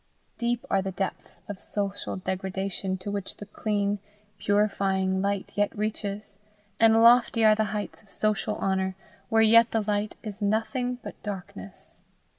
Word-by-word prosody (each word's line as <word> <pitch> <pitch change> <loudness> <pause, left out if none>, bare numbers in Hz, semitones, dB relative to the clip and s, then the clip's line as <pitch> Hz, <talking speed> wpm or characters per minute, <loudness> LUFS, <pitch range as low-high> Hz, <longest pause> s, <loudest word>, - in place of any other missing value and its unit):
Deep 240 0 -1
are 195 - +2
the 190 0 -3
depths 190 0 -5
of 205 -2 -6
social 200 -1 -3
degradation 190 0 -3
to 185 +2 -6
which 200 -1 -4
the 205 - -8
clean, 205 -1 -1 0.4
purifying 195 -2 +1
light 200 0 -1
yet 205 0 +2
reaches, 205 -1 -4 0.4
and 225 0 +6
lofty 235 -1 +6
are 215 - +8
the 215 0 +1
heights 210 0 -4
of 215 - -25
social 215 +1 0
honour 190 -1 0 0.3
where 225 0 +4
yet 230 +1 +7
the 225 - +1
light 210 0 -1
is 210 -1 -7
nothing 245 +4 0
but - - -9
darkness. 180 - -8
205 Hz, 150 wpm, -27 LUFS, 195-220 Hz, 0.4 s, are